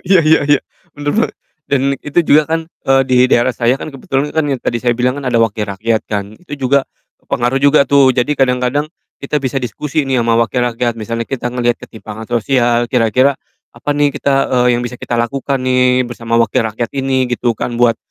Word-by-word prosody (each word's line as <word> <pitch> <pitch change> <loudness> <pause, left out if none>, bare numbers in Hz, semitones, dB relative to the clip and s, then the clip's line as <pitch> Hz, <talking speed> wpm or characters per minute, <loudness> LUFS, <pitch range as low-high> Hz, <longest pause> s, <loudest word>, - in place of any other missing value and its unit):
iya 185 0 +4
iya 160 0 +4
iya. 145 -1 +3 0.3
Benar 145 0 -3
banget. 230 - 0 0.3
Dan 140 -2 0 0.2
itu 150 +3 +1
juga 155 -2 +4
kan, 165 +2 -1
eee, 135 -5 +1
di 130 - +2
daerah 125 0 +2
saya 125 +3 +1
kan - - -5
kebetulan 135 0 -2
kan 160 - +2
yang 130 - -3
tadi - - -1
saya 120 - +3
bilang 125 +3 0
kan 140 - -6
ada 120 -2 +1
wakil 110 -1 0
rakyat 110 +3 -2
kan. 105 0 -4
Itu 145 -6 -10
juga 140 0 +3 0.4
pengaruh 120 +2 -1
juga 140 +1 +4
tuh. 140 -2 +5
Jadi 130 +4 0
kadang-kadang, 130 +3 0 0.3
kita 150 +2 -1
bisa 130 -3 -3
diskusi 135 +5 -2
nih 135 -2 0
sama 115 0 +1
wakil 115 +2 +1
rakyat. 120 0 0
Misalnya 115 +1 -3
kita 130 -1 -4
ngelihat 120 -1 -1
ketimpangan 110 -1 -9
sosial, 120 0 +1
kira-kira 125 +3 +3 0.4
apa - - -5
nih 145 -1 +2
kita 140 +1 0 0.2
eee, 125 -1 +3
yang 120 - -2
bisa 125 0 -7
kita 120 - -3
lakukan 135 +4 -1
nih 125 0 +3
bersama 115 -1 -3
wakil 115 -1 +2
rakyat 115 +2 -4
ini 135 -1 0
gitu 120 -1 0
kan, 120 - -3
buat 120 -2 +4
125 Hz, 200 wpm, -15 LUFS, 120-140 Hz, 0.4 s, tuh